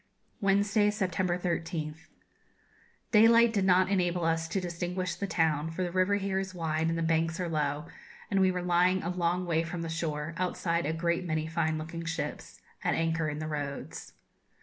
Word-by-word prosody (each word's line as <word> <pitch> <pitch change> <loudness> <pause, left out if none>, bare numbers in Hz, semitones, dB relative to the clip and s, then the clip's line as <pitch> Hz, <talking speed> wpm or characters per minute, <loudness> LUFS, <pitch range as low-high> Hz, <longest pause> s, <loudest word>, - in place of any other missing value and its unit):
Wednesday, 200 +1 +3
September 185 -3 0
13th. 165 -2 -3 1.0
Daylight 230 +1 +6
did 200 -3 +1
not 185 0 +5
enable 180 -3 +1
us 165 0 +1
to 195 - -1
distinguish 180 0 -3
the 200 +3 -4
town, 160 -3 +1
for 165 +3 -3
the 175 - -2
river 185 +2 +2
here 195 -1 -1
is 190 -1 -5
wide 160 -1 0
and 165 - -1
the 165 - -1
banks 165 +1 +1
are 180 - -1
low, 150 -1 -1 0.5
and 195 - +2
we 190 - +5
were 180 -1 -2
lying 180 +1 +3
a 170 - -2
long 180 0 0
way 165 -2 +1
from 165 +1 -4
the 165 - -4
shore, 160 -1 -3
outside 170 -2 -1
a - - +1
great 170 +2 0
many 155 -2 -1
fine 160 -1 0
looking 165 +2 -6
ships, 165 0 -5 0.2
at - - +1
anchor 165 -1 0
in 150 - -4
the 155 - -4
roads. 145 -2 -5
170 Hz, 185 wpm, -29 LUFS, 160-185 Hz, 1.0 s, Daylight